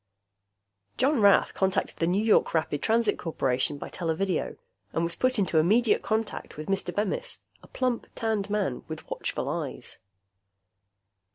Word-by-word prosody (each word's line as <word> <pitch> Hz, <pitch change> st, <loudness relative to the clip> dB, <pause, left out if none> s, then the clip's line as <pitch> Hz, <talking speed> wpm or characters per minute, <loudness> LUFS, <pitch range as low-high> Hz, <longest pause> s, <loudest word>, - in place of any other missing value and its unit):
John 265 Hz, -1 st, +2 dB
Rath 200 Hz, -1 st, +5 dB
contacted 190 Hz, -1 st, 0 dB
the 165 Hz, -, +1 dB
New 190 Hz, +4 st, +2 dB
York 220 Hz, -5 st, +3 dB
Rapid 155 Hz, -2 st, 0 dB
Transit 225 Hz, -1 st, +2 dB
Corporation 135 Hz, -3 st, 0 dB
by -, -, -6 dB
televideo 175 Hz, +1 st, -2 dB, 0.4 s
and 165 Hz, -, 0 dB
was 170 Hz, 0 st, 0 dB
put 255 Hz, +7 st, +1 dB
into 185 Hz, -5 st, +2 dB
immediate 215 Hz, +8 st, +3 dB
contact 220 Hz, -6 st, -3 dB
with 155 Hz, +3 st, -6 dB
Mr. 195 Hz, 0 st, 0 dB
Bemis, 205 Hz, -1 st, -2 dB, 0.2 s
a -, -, -16 dB
plump, 255 Hz, -2 st, -1 dB
tanned 215 Hz, -3 st, -1 dB
man 205 Hz, -11 st, -1 dB
with -, -, -7 dB
watchful -, -, -3 dB
eyes. -, -, -4 dB
195 Hz, 145 wpm, -27 LUFS, 165-220 Hz, 0.4 s, Rath